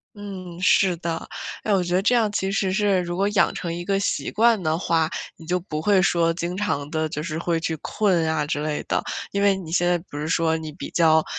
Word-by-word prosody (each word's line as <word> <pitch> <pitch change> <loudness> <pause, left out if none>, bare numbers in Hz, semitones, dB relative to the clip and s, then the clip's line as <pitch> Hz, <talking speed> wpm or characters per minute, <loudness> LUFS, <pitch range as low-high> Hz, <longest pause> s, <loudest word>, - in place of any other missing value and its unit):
嗯， 185 -4 -8
是 185 -1 +4
的。 165 -1 -4 0.3
哎 215 - 0
我 195 - +4
觉 175 0 -2
得 185 - +3
这 245 - +3
样 220 -3 +2
其 195 -1 -1
实 195 -1 0
是 200 -1 +2
如 175 0 -4
果 195 +2 +2
养 205 -2 +2
成 170 - -4
一 175 +1 -5
个 195 +1 +1
习 200 - -1
惯 225 -1 +3
的 160 -2 0
话， 165 -2 +1 0.3
你 160 - -13
就 180 +2 0
不 155 -4 -5
会 195 +3 +3
说 170 -1 +3
经 175 +1 -3
常 150 -8 -2
地 155 -1 -1
就 150 -1 -4
是 155 -1 -4
会 170 0 0
去 165 0 -2
困 175 0 +1
啊 160 -1 0
之 145 0 -2
类 150 -1 -2
的。 - - +1 0.3
因 200 - -1
为 200 -1 +4
你 180 -4 -8
现 175 +1 +2
在 175 0 +3
不 145 - -6
是 150 +1 -3
说 165 -1 +2
你 160 -1 -6
比 - - -7
较， 160 -2 +4
175 Hz, 265 characters per minute, -23 LUFS, 160-195 Hz, 0.3 s, 是